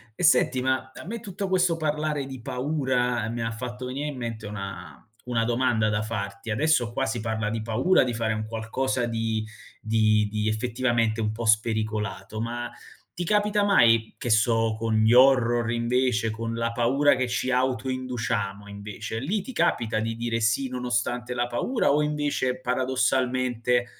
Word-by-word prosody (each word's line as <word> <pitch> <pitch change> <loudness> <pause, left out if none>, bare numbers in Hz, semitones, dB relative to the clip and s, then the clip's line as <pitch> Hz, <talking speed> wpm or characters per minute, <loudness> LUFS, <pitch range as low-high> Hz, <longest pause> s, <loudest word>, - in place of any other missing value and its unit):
E - - -7
senti, 130 -4 +4
ma 130 0 -1
a - - -10
me 230 +6 -5
tutto 200 -2 -5
questo 180 -2 +3
parlare 150 -2 -1
di 130 -2 -8
paura 125 -3 -1
mi 115 0 -3
ha 115 - -1
fatto 125 +2 -6
venire 140 +4 -3
in 145 -3 -5
mente 115 -3 -5
una 100 -2 -7 0.3
una 115 -2 0
domanda 120 -2 +1
da 105 0 0
farti. 100 -1 -5
Adesso 125 -1 +2
qua 135 +3 -1
si 120 -3 -2
parla 110 -1 -2
di 115 +1 -3
paura, 120 +12 +3
di 125 - -2
fare 115 -1 -1
un 110 0 -3
qualcosa 120 +3 -2
di 115 -1 -1 0.4
di 110 -1 +2
di 105 0 -1
effettivamente 115 0 0
un 105 -1 0
po' 115 +1 -5
spericolato, 110 -2 0
ma 120 +1 -3 0.5
ti 175 - -3
capita 210 +2 +2
mai, 115 - +4
che 120 - -2
so, 115 0 +3
con 110 0 -1
gli 110 +1 +4
horror, 120 -2 +5
invece, 120 -1 +1
con 115 +1 -4
la 115 0 -1
paura 130 +5 +3
che 130 0 0
ci 125 +1 -1
autoinduciamo, 125 -5 -1
invece, 105 +2 -6
lì 190 - -1
ti 260 - -8
capita 120 - +1
di 115 +1 -2
dire 115 0 -2
"sì", 115 +4 +1
nonostante 125 -1 -2
la 120 0 +1
paura, 140 - 0
o 150 +1 +3
invece 145 -4 -1
paradossalmente 125 -1 +1
120 Hz, 170 wpm, -26 LUFS, 110-130 Hz, 0.5 s, horror